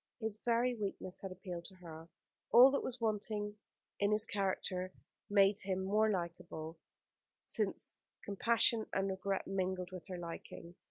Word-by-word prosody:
His 220 -2 -2
very 240 +1 +3
weakness 195 -4 -4
had 195 - -5
appealed 180 -2 -6
to 190 - -11
her. 165 -2 -10 0.4
All 250 +3 +10
that 280 - +1
was 255 0 -4
wanting 210 -1 -1 0.4
in 205 +1 +3
his 210 +1 +4
character 190 -3 -1 0.4
made 200 0 +5
him 190 0 -1
more 215 +3 +3
likable, 170 -3 -4 0.7
since - - -1 0.3
compassion 230 +2 +3
and 195 0 +1
regret 190 +1 -2
mingled 185 -1 -2
with 185 0 -8
her 185 -2 -5
liking. 170 0 -8
195 Hz, 145 wpm, -36 LUFS, 180-215 Hz, 0.7 s, All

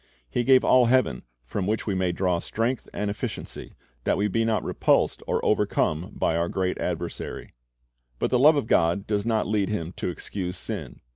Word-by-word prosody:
He 120 - -1
gave 130 +1 +5
all 125 -2 +5
heaven, 120 - +2 0.2
from 95 +9 -3
which 110 +1 -1
we 105 - -1
may 95 -1 +1
draw 90 -1 0
strength 115 +7 -2
and 105 0 -2
efficiency, 100 - -6 0.3
that - - +1
we 105 - +1
be 115 +3 +1
not 115 -1 +1
repulsed - - +1
or - - 0
overcome 80 +3 +1
by 80 - +1
our 85 +1 0
great 95 -1 -1
adversary. - - -4 0.6
But - - -1
the 125 - +3
love 150 +4 +7
of 145 - 0
God 85 -1 +2
does 105 0 -1
not 110 -2 +1
lead 105 -2 0
Him 85 -5 -3
to - - -2
excuse 90 +1 -5
sin. 90 - -5
100 Hz, 190 wpm, -25 LUFS, 90-115 Hz, 0.6 s, love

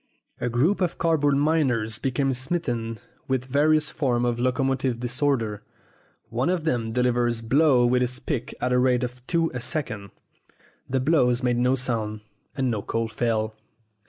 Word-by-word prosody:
A 120 - -1
group 150 - +1
of 175 -2 0
card 165 -2 +2
board 145 -1 +3
miners 130 -8 +1
became 135 +1 0
smitten 125 -5 -2 0.3
with 130 -1 0
various 150 +3 +2
forms 125 -5 0
of 120 -1 0
locomotive 130 -1 0
disorder. 120 -4 0 0.7
One 125 +7 0
of 180 -3 0
them 120 -7 -1
delivered 120 -1 0
blows 135 -2 +4
with 125 0 +3
his 125 0 0
pick 130 -5 -3
at 125 - 0
the 125 0 +3
rate 125 0 +2
of 125 +1 -5
two 165 -1 +1
a 125 - -3
second. 110 -7 -4 0.8
The 130 +1 +1
blows 130 -4 +2
made 120 -1 +2
no 125 +2 +3
sound, 110 -4 -2 0.4
and 130 -2 +1
no 110 -3 -2
coal 115 +2 -2
fell. 110 -1 -1
125 Hz, 160 wpm, -25 LUFS, 120-140 Hz, 0.8 s, blows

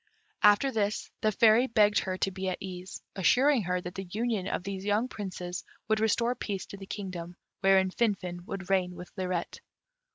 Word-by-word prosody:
After 210 +6 +5
this 210 -3 -1
the 215 - +3
Fairy 225 +4 +5
begged 210 -3 +4
her 185 -1 -3
to 195 - 0
be 190 0 -3
at 185 - -2
ease, 185 -1 -7
assuring 250 +7 +4
her 180 +1 0
that 180 0 -7
the 195 0 -5
union 215 -1 -1
of 180 - -2
these 195 0 -5
young 210 +4 +1
Princes 180 -5 -5 0.2
would 220 0 +2
restore 235 +2 +2
peace 200 -6 -4
to 200 - -9
the 195 -1 -10
kingdom, 180 -4 -6 0.2
wherein 190 -1 +4
Finfin 185 -6 -1
would 195 -2 -5
reign 180 -2 +2
with 180 - -10
Lirette. 185 -3 -3
195 Hz, 185 wpm, -29 LUFS, 185-215 Hz, 0.2 s, After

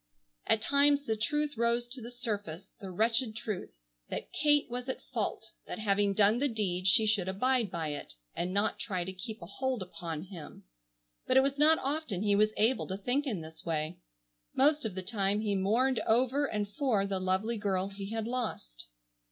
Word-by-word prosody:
At 220 - +3
times 285 +2 +3
the 220 - 0
truth 295 +7 -1
rose 235 +1 +2
to 250 +1 -6
the 235 - -7
surface, 205 -7 -4
the 195 - -6
wretched 225 +4 +1
truth, 205 - -5 0.3
that - - -5
Kate 295 -1 +3
was 245 +2 -5
at 260 - -4
fault, - - -2 0.2
that - - -5
having 205 -2 +1
done 210 +3 +4
the 285 - +2
deed 190 -5 -1
she 205 +4 +5
should 210 -4 +2
abide 235 +3 +1
by 165 -3 -3
it, 145 - -6 0.2
and 180 +1 -2
not 200 +3 0
try 185 -5 -2
to 190 +2 -5
keep 215 +1 -7
a - - -6
hold 255 +3 -2
upon 165 -3 -6
him, 180 -5 -10 0.6
but 255 - +4
it 265 - +7
was 280 +1 -1
not 315 +2 +6
often 275 - -2
he 205 -1 +3
was 215 +1 +4
able 230 +5 +2
to 190 - -3
think 250 +8 0
in 210 -10 -2
this 160 0 -10
way. 155 - -2 0.6
Most 295 +1 +4
of 210 -5 -3
the 190 - -4
time 200 0 0
he 210 -2 0
mourned 225 +7 +2
over 260 +5 +3
and 210 -3 -2
for 220 -3 +1
the 195 -1 -1
lovely 190 +5 0
girl 195 -2 0
he 195 0 -7
had 225 0 -2
lost. 225 - -4
215 Hz, 195 wpm, -31 LUFS, 190-250 Hz, 0.6 s, it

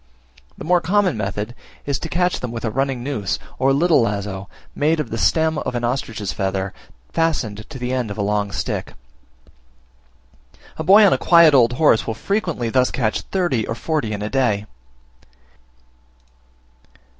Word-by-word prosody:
The - - -8
more 175 +1 +3
common 190 +1 +2
method 105 +2 -3 0.3
is 140 -1 -1
to 165 - -6
catch 180 +2 0
them 125 - -5
with 115 0 -5
a 110 - -1
running 135 0 -1
noose, 125 -8 -2 0.2
or 135 +1 +3
little 160 +2 +3
lazo, 100 -3 -3 0.2
made 155 +2 +1
of 150 - -3
the - - -2
stem 160 -1 +2
of 125 - -4
an 120 - -2
ostrich's 115 -5 -2
feather, 95 -1 -2 0.4
fastened 115 -11 -1
to 150 - -8
the 125 0 -3
end 125 -4 -1
of 100 - -6
a 100 - -1
long 105 0 -1
stick. - - -4 1.8
A 160 - -3
boy 205 +6 +7
on 195 - +5
a - - 0
quiet 170 -3 +6
old 125 -3 +5
horse 125 -4 +3
will 110 - -2
frequently 170 - -2
thus 130 0 +3
catch 110 -4 -1
thirty 175 - -1
or 115 - -3
forty 150 -5 -2
in 105 -1 -4
a 105 - -3
day. 115 -6 +1
125 Hz, 165 wpm, -20 LUFS, 105-160 Hz, 1.8 s, boy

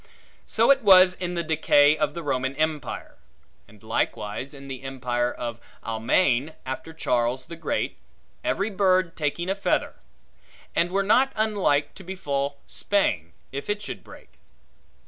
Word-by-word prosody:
So 230 +5 +5
was 185 -5 +7
it - - -20
in 180 0 -2
the 170 - -1
decay 150 -2 +4
of 150 -1 -1
the 170 - -5
Roman 130 -1 -1
empire; 155 -1 -3 0.5
and 105 0 -19
likewise 110 +2 -2
in 140 -2 -10
the 135 -1 -6
empire 125 -2 -1
of 120 -1 -5 0.2
Almaigne, 120 +5 +1
after 130 +5 -5
Charles 125 -4 0
the 170 - -8
Great, 165 - -2 0.5
every 205 +3 0
bird 185 -3 +2
taking 160 +3 -2
a 190 - +1
feather; 195 - 0 0.8
and 170 - +2
were 195 +2 +1
not 250 +7 +4
unlike 200 -10 +1
to 190 - -12
befall 145 -7 -2
to 145 - -25 0.2
Spain, 85 - 0 0.2
if 140 +6 -6
it 205 0 0
should - - -7
break. - - -16
155 Hz, 150 wpm, -25 LUFS, 130-185 Hz, 0.8 s, was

